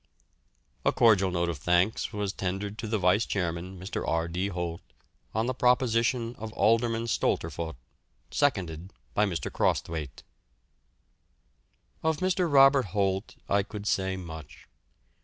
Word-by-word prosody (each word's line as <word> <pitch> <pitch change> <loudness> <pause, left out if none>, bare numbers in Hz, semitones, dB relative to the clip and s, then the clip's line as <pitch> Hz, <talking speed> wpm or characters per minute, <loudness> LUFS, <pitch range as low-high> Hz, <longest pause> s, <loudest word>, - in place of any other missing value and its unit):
"A - - +3
cordial 100 -5 +4
vote 85 -1 0
of 80 -4 -4
thanks 90 +8 +1
was 105 -1 -2
tendered 100 +3 -3
to 110 - -4
the 110 0 0
vice 95 +3 +3
chairman, 90 -1 -3
Mr. 95 +3 -4
R. 80 0 0
D. 90 +3 -2
Holt, 85 -3 -4 0.5
on 110 +1 +1
the 130 - 0
proposition 125 -1 +2
of 110 0 -6
Alderman 115 +1 +2
Stolterfoht, 80 - -1 0.6
seconded 95 - 0 0.2
by 105 0 +3
Mr. 85 -4 -3
Crosthwaite." 75 -4 -1 1.8
Of 160 -1 +1
Mr. 185 -2 +1
Robert 135 -2 +6
Holt 95 +1 0
I 100 0 +3
could 100 +1 -8
say 95 -1 0
much. 80 -4 -10
100 Hz, 130 wpm, -28 LUFS, 90-115 Hz, 1.8 s, Robert